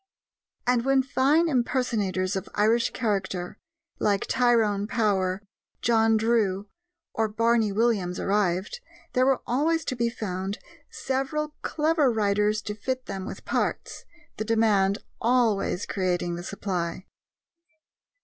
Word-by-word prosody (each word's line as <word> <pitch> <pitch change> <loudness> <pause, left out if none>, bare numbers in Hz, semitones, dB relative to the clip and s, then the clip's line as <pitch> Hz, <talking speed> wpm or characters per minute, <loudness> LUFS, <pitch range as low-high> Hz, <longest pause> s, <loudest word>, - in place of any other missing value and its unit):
And 245 -1 +2
when 270 0 +3
fine 280 +5 +3
impersonators 230 - 0
of 190 - -4
Irish 225 +3 +3
character 190 -5 -2 0.4
like 200 -2 +1
Tyrone 225 -4 +2
Power, 200 -4 0 0.4
John 225 -1 +4
Drew, 215 -3 +1 0.5
or 220 -1 +1
Barney 225 0 +2
Williams 200 -4 0
arrived, 195 - 0 0.3
there 255 +1 +3
were 270 -2 +2
always 310 +6 +1
to 255 - -2
be 235 -1 0
found 195 -3 -4 0.3
several 270 +3 -2
clever 305 -3 +2
writers 210 0 +1
to 210 - -4
fit 255 +5 -4
them 190 -1 -5
with - - -8
parts, - - -2 0.3
the - - -2
demand 210 -3 +2 0.2
always 225 -6 +1
creating 180 -2 -1
the 170 - -5
supply. 185 -1 -4
220 Hz, 120 wpm, -26 LUFS, 195-245 Hz, 0.5 s, John